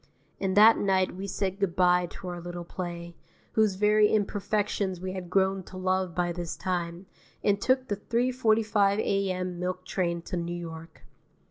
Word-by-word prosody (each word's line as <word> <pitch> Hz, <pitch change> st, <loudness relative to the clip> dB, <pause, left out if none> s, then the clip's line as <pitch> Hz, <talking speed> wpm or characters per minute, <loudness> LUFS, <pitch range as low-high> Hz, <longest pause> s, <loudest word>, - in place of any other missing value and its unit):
And 190 Hz, 0 st, -1 dB
that 220 Hz, +2 st, +8 dB
night 190 Hz, -2 st, +1 dB
we 195 Hz, +2 st, -5 dB
said 195 Hz, 0 st, -2 dB
good 195 Hz, -4 st, 0 dB
bye 180 Hz, -1 st, +4 dB
to 185 Hz, -, -9 dB
our 175 Hz, -1 st, -6 dB
little 175 Hz, 0 st, -6 dB
play, 170 Hz, -1 st, -6 dB, 0.4 s
whose 215 Hz, -3 st, +2 dB
very 210 Hz, +1 st, +4 dB
imperfections 205 Hz, -2 st, 0 dB
we 185 Hz, +1 st, -4 dB
had 185 Hz, -2 st, -6 dB
grown 190 Hz, +1 st, +2 dB
to 185 Hz, -, -10 dB
love 185 Hz, -1 st, 0 dB
by 175 Hz, -1 st, 0 dB
this 175 Hz, -1 st, -5 dB
time, 175 Hz, 0 st, -3 dB, 0.4 s
and 205 Hz, 0 st, +2 dB
took 260 Hz, 0 st, +2 dB
the 205 Hz, -, -2 dB
3:45 220 Hz, -3 st, +2 dB
A.M. 185 Hz, -4 st, -1 dB
milk 185 Hz, 0 st, -3 dB
train 170 Hz, -2 st, -1 dB
to 185 Hz, -, -5 dB
New 175 Hz, 0 st, -3 dB
York. 165 Hz, -1 st, -9 dB
185 Hz, 165 wpm, -28 LUFS, 175-205 Hz, 0.4 s, that